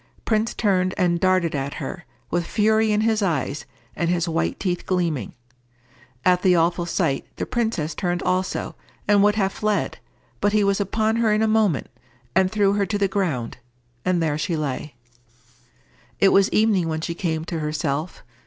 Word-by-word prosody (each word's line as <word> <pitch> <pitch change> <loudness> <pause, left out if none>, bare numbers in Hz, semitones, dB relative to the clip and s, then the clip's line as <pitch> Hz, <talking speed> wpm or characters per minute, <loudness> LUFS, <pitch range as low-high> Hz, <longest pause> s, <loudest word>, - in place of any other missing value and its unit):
Prince 220 0 0
turned 185 -4 +1
and 175 -3 +2
darted 185 -3 +2
at 140 0 -3
her, 175 - -6 0.3
with 175 0 +1
fury 220 0 +2
in 210 0 +2
his 220 -1 +1
eyes, 150 -6 -1 0.3
and 170 - -1
his 175 0 +1
white 165 0 -1
teeth 180 -3 -2
gleaming. 170 - -1 0.9
At 180 -1 +4
the 180 -1 +4
awful 170 +1 +1
sight 160 -6 -1
the - - -3
princess 220 -10 -1
turned 175 +2 -2
also, 185 +1 -1 0.3
and 205 -1 +5
would 205 +1 +4
have 195 -2 0
fled, 210 -2 -1 0.4
but 205 - +1
he 210 -1 +3
was 200 0 +1
upon 220 +3 0
her 230 -2 +2
in 215 +1 +2
a - - +3
moment, 215 -8 +2 0.5
and 190 0 +3
threw 205 -2 +2
her 200 -1 +1
to 205 - -1
the 200 -1 +2
ground, 155 - -2 0.4
and 180 -2 +1
there 150 -2 0
she 165 +1 -1
lay. 145 -1 -4 1.2
It 195 - +6
was 195 +1 +4
evening 210 -6 +2
when 160 0 -2
she 170 - -3
came 160 -2 -2
to 165 -1 -4
herself. 150 +1 -3
185 Hz, 175 wpm, -23 LUFS, 165-205 Hz, 1.2 s, It